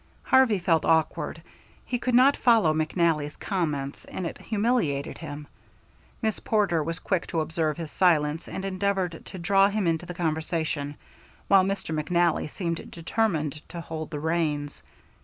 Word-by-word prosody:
Harvey 260 Hz, -5 st, +4 dB
felt 170 Hz, -3 st, +2 dB
awkward. 160 Hz, -1 st, +1 dB, 0.4 s
He 245 Hz, -, -2 dB
could 250 Hz, 0 st, 0 dB
not 265 Hz, +3 st, +6 dB
follow 225 Hz, -10 st, +4 dB
McNally's 155 Hz, -1 st, 0 dB
comments, 150 Hz, -8 st, -2 dB
and 185 Hz, -, -5 dB
it 165 Hz, -, -5 dB
humiliated 205 Hz, -, 0 dB
him. 150 Hz, -2 st, -7 dB, 0.8 s
Miss 220 Hz, -1 st, 0 dB
Porter 200 Hz, -7 st, +1 dB
was 165 Hz, +2 st, -3 dB
quick 185 Hz, -1 st, -1 dB
to 165 Hz, -, -1 dB
observe 160 Hz, 0 st, -1 dB
his 165 Hz, -3 st, -6 dB
silence, 160 Hz, -3 st, +2 dB
and 190 Hz, -, -5 dB
endeavored 190 Hz, -3 st, -1 dB
to -, -, -8 dB
draw 195 Hz, +3 st, +4 dB
him 205 Hz, -1 st, -1 dB
into 165 Hz, +1 st, 0 dB
the 180 Hz, -, -6 dB
conversation, 160 Hz, -3 st, -2 dB, 0.5 s
while 195 Hz, -1 st, +7 dB
Mr. 195 Hz, -4 st, -2 dB
McNally 170 Hz, +1 st, +1 dB
seemed 170 Hz, -1 st, -4 dB
determined 165 Hz, -5 st, -1 dB
to 175 Hz, -, -6 dB
hold 160 Hz, -1 st, -6 dB
the 150 Hz, -, -4 dB
reins. 155 Hz, -2 st, -1 dB
170 Hz, 150 wpm, -26 LUFS, 155-195 Hz, 0.8 s, while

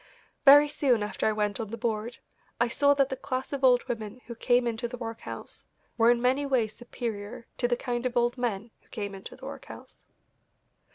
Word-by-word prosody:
Very 290 Hz, +1 st, +9 dB
soon 260 Hz, -7 st, +1 dB
after 210 Hz, -, -1 dB
I -, -, +3 dB
went 210 Hz, 0 st, -1 dB
on 220 Hz, -3 st, -4 dB
the 230 Hz, -, -5 dB
board 230 Hz, 0 st, -2 dB, 0.4 s
I 235 Hz, -, +3 dB
saw 285 Hz, +3 st, +4 dB
that 275 Hz, -1 st, +2 dB
the 265 Hz, -, -2 dB
class 265 Hz, 0 st, -4 dB
of 275 Hz, -1 st, -3 dB
old 250 Hz, -2 st, +5 dB
women 220 Hz, 0 st, -5 dB
who 235 Hz, -, -7 dB
came 245 Hz, +1 st, +2 dB
into 235 Hz, 0 st, -2 dB
the 245 Hz, +1 st, -7 dB
workhouse 230 Hz, -1 st, -7 dB, 0.3 s
were 230 Hz, 0 st, +4 dB
in 240 Hz, 0 st, +4 dB
many 255 Hz, +4 st, +2 dB
ways 245 Hz, -6 st, 0 dB
superior 235 Hz, -1 st, -6 dB
to 245 Hz, -, +2 dB
the 240 Hz, 0 st, +1 dB
kind 245 Hz, -2 st, -3 dB
of 245 Hz, 0 st, -4 dB
old 240 Hz, +1 st, +2 dB
men 230 Hz, -3 st, -3 dB
who -, -, -30 dB
came 205 Hz, -2 st, -5 dB
into 195 Hz, 0 st, -9 dB
the -, -, -12 dB
workhouse. -, -, -10 dB
240 Hz, 205 wpm, -28 LUFS, 225-255 Hz, 0.4 s, Very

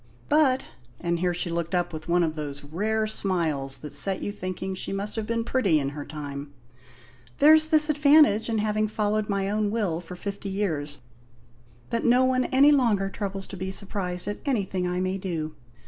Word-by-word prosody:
But" 290 Hz, -4 st, +3 dB, 0.3 s
and 170 Hz, -1 st, -1 dB
here 180 Hz, 0 st, +1 dB
she 175 Hz, 0 st, -1 dB
looked 170 Hz, +1 st, -2 dB
up 175 Hz, -1 st, -1 dB
with 160 Hz, 0 st, -7 dB
one 175 Hz, +1 st, +3 dB
of 160 Hz, -2 st, 0 dB
those 145 Hz, -2 st, -6 dB
rare 215 Hz, +9 st, -1 dB
smiles 165 Hz, -10 st, -1 dB
that 150 Hz, -2 st, -8 dB
set 190 Hz, +7 st, +4 dB
you -, -, -2 dB
thinking 185 Hz, -1 st, -5 dB
she 190 Hz, -, -3 dB
must 200 Hz, +2 st, -3 dB
have 220 Hz, -2 st, -3 dB
been 230 Hz, 0 st, -1 dB
pretty 220 Hz, -9 st, +2 dB
in 140 Hz, -2 st, -1 dB
her 145 Hz, +1 st, -7 dB
time 145 Hz, -1 st, -7 dB, 0.9 s
"there's 310 Hz, +1 st, +6 dB
this 305 Hz, -2 st, +4 dB
advantage 295 Hz, -7 st, +4 dB
in 225 Hz, -, 0 dB
having 215 Hz, 0 st, 0 dB
followed 215 Hz, 0 st, -1 dB
my 195 Hz, -1 st, 0 dB
own 210 Hz, +1 st, 0 dB
will 200 Hz, -7 st, -1 dB
for 180 Hz, +1 st, -9 dB
fifty 200 Hz, +2 st, -6 dB
years: 155 Hz, -8 st, -2 dB, 0.9 s
that 230 Hz, -, 0 dB
no 250 Hz, +2 st, +4 dB
one 255 Hz, -1 st, +1 dB
any 280 Hz, +2 st, +5 dB
longer 215 Hz, -9 st, +2 dB
troubles 195 Hz, -2 st, -4 dB
to 195 Hz, -, -9 dB
be 190 Hz, +1 st, -4 dB
surprised 190 Hz, -2 st, -1 dB
at 205 Hz, -, -3 dB
anything 195 Hz, -9 st, -1 dB
I 180 Hz, 0 st, -2 dB
may 185 Hz, +1 st, -1 dB
do. 165 Hz, -5 st, -4 dB
195 Hz, 190 wpm, -26 LUFS, 170-220 Hz, 0.9 s, there's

